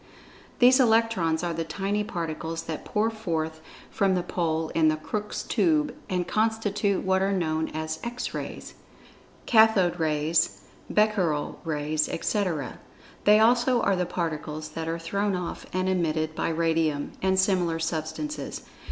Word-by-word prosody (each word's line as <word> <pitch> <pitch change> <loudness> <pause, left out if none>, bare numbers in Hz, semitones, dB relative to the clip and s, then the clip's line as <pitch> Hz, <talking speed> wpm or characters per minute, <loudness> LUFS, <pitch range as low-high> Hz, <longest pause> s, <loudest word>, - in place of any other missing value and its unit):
These 255 +2 +6
Electrons 225 -9 +3
are 175 -1 -1
the 165 0 -2
tiny 200 +4 -2
particles 165 -4 -4
that 160 -2 -6
pour 220 +2 0
forth 160 -7 -3 0.3
from 195 -2 +2
the 180 - 0
pole 160 -3 -1
in 160 -1 +2
the 155 - +3
Crookes' 210 +7 -4
Tube, 305 -3 +1 0.2
and 180 -2 -1
constitute 210 -2 0
what 190 0 +2
are 195 +1 +1
known 160 -4 0
as 155 0 -4
"X 240 +1 -4
Rays," - - -6 0.7
"Cathode 220 -6 +4
Rays," 155 +1 +1 0.3
"Becquerel 195 -9 +1
Rays," 155 -1 -1
etc. 165 - -2 0.5
They 210 +1 +7
also 240 +2 +4
are 200 - +3
the 180 -1 -1
particles 155 -3 -4
that 160 +1 -5
are 165 0 -1
thrown 200 +4 -1
off 180 -1 -5
and 185 0 -1
emitted 160 -4 0
by - - -1
Radium, 160 -3 0
and 190 0 +2
similar 185 -4 +2
substances. 165 - -4
175 Hz, 145 wpm, -26 LUFS, 160-210 Hz, 0.7 s, They